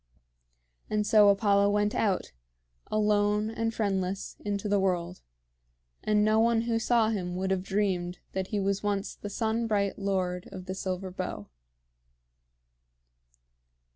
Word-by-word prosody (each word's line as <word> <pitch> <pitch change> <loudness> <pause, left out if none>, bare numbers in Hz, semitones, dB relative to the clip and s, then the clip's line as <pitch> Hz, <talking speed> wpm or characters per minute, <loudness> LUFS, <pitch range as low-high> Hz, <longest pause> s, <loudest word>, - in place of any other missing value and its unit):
And 210 0 0
so 210 -1 +6
Apollo 200 0 +3
went 205 +1 +1
out, 195 - 0 0.6
alone 210 0 +2
and 225 0 -1
friendless, 195 -3 -2
into 205 0 -2
the 205 0 +2
world; 180 -2 -1 0.8
and 210 0 +3
no 215 +1 +3
one 230 0 +3
who 230 -1 0
saw 230 -1 +3
him 180 -5 -2
would 190 +1 -1
have 190 -1 +1
dreamed 190 -2 -1
that 190 -1 -3
he 210 - -2
was 195 0 0
once 200 -1 -1
the 205 - -8
sun 225 +2 -1
bright 200 -2 0
Lord 185 -2 -2
of 185 -2 -8
the 185 - -4
Silver 190 0 -4
Bow. 180 - -5
200 Hz, 140 wpm, -28 LUFS, 190-215 Hz, 0.8 s, so